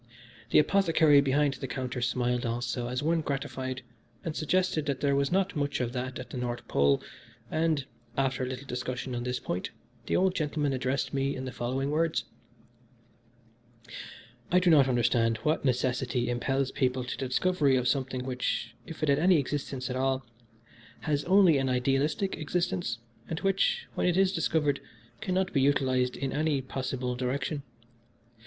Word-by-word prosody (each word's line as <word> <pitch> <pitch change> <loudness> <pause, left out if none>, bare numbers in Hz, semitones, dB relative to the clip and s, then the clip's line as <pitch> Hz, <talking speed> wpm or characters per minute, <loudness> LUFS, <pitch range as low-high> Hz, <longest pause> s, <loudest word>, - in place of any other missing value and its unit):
The - - +4
apothecary 160 -3 +5
behind 140 +1 +2
the 135 0 -6
counter 130 -1 -4
smiled 125 0 0
also 120 +1 -2
as 125 +3 -2
one 165 +1 +2
gratified 135 -3 -3 0.4
and 160 -2 -3
suggested 160 -2 +1
that 140 -2 -1
there 140 -1 +2
was 140 +2 +1
not 195 +1 +1
much 145 -1 -1
of 120 -1 -2
that 130 0 -3
at - - -8
the - - -5
North 120 -1 -4
Pole, 70 0 +3 0.5
and, 155 -3 +1 0.3
after 135 -1 +1
a 130 - -1
little 130 +2 -6
discussion 125 0 -4
on 120 - -2
this 125 +1 -2
point, 90 - -3 0.4
the - - +1
old 185 0 +3
gentleman 150 -3 -1
addressed 130 +2 -1
me 135 0 0
in 130 - -5
the 130 - -4
following 130 +3 -2
words: 160 +1 +1 2.3
"I 180 - +5
do 180 -1 +4
not 140 -4 +6
understand 120 -2 +2
what 155 +1 +1
necessity 125 -1 0
impels 135 +2 0
people 130 -1 0
to 125 - -4
the 135 - -3
discovery 145 0 +2
of 125 -1 +1
something, 130 -1 -1
which, 125 -1 -2
if 160 -1 -7
it 155 - +2
has 140 +1 +4
any 180 +2 +5
existence 135 -2 -2
at - - -3
all, 130 0 0 0.8
has 145 -2 0
only 185 -5 +5
an 135 -1 0
idealistic 135 - +1
existence, 170 -5 -1 0.3
and 160 - -2
which, 195 - +1
when - - 0
it 180 0 +2
is 190 -1 +4
discovered, 150 -6 +1 0.4
cannot 190 -2 -1
be 135 - +3
utilised 130 -2 +2
in 135 0 -2
any 150 -1 +1
possible 130 -1 -3
direction. 130 +4 -2
135 Hz, 165 wpm, -29 LUFS, 125-155 Hz, 2.3 s, not